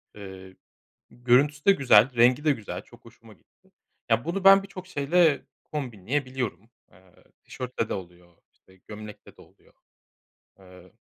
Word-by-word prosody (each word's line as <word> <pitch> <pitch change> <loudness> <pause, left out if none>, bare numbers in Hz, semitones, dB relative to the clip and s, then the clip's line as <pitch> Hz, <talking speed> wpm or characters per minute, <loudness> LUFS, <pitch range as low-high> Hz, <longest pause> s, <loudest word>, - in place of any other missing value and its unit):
Eee, 95 -2 -11 0.6
görüntüsü 135 +5 +1
de 200 - +6
güzel, 130 - +4
rengi 125 +5 +4
de 155 - +4
güzel, 110 -7 -7
çok - - -20
hoşuma - - -17
gitti. - - -34 0.4
Ya, 115 +1 +2
bunu 180 +4 -4
ben 195 0 +8
birçok 195 -2 -11
şeyle 160 -1 +1 0.2
kombinleyebiliyorum. 125 - -4 0.2
Eee, 90 0 -24 0.3
tişörtle 125 -3 -5
de - - -3
oluyor, 90 -2 -11 0.2
işte, 95 0 -26
gömlekle 105 -1 -11
de - - -18
oluyor. - - -25 0.9
Eee 90 -1 -17
120 Hz, 135 wpm, -25 LUFS, 95-145 Hz, 0.9 s, ben